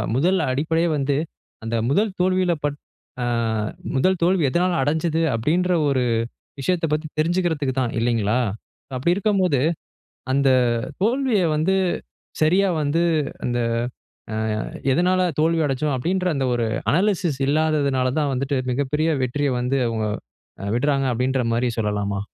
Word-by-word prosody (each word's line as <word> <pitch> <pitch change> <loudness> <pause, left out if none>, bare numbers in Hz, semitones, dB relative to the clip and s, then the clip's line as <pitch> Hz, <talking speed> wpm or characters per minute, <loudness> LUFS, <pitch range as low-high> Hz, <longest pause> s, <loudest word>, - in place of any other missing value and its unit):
முதல் 180 +8 +3
அடிப்படையே 160 +5 +1
வந்து, 140 0 0 0.5
அந்த 115 +1 -2
முதல் 205 +8 +2
தோல்வியில 185 -1 +2
பட் 145 0 -2 0.5
அ - - 0 0.7
முதல் 185 +8 +2
தோல்வி 175 -5 +3
எதுனால 175 +4 +1
அடைஞ்சது 160 +2 0
அப்டின்ற 170 +10 +1
ஒரு 130 -2 +1 0.6
விஷயத்த 170 +4 0
பத்தி 155 +1 -1
தெரிஞ்சுக்கிறதுக்கு 160 -5 0
தான் 120 - -1
இல்லைங்களா? 115 -1 +1 0.6
அப்டி 170 +7 +2
இருக்கும்போது, 190 -9 +1 0.7
அந்த 140 0 +3 0.5
தோல்விய 240 -2 +2
வந்து 170 +6 +2 0.7
சரியா, 190 +5 +3
வந்து 150 +4 +1 0.4
அந்த 120 0 0 0.7
ஆ - - -2 0.6
எதுனால 185 +3 +2 0.2
தோல்வி 165 0 +2
அடைச்சோம் 135 +1 -1
அப்டின்ற, 185 +7 0
அந்த 135 -1 0
ஒரு 115 -2 0 0.3
அனாலிசிஸ் 180 -6 +1
இல்லாதனால 145 -4 +1
தான் 145 -2 0
வந்துட்டு 135 +1 -1
மிகப்பெரிய 145 +5 0
வெற்றிய 140 +2 0
வந்து 135 +2 0
அவங்க 110 -2 -1 0.7
விட்றாங்க. 140 +1 +1
அப்டிங்கற 125 +2 0
மாரி 120 +1 +1
சொல்லலாமா? 100 -2 -1
150 Hz, 125 wpm, -22 LUFS, 130-180 Hz, 0.7 s, முதல்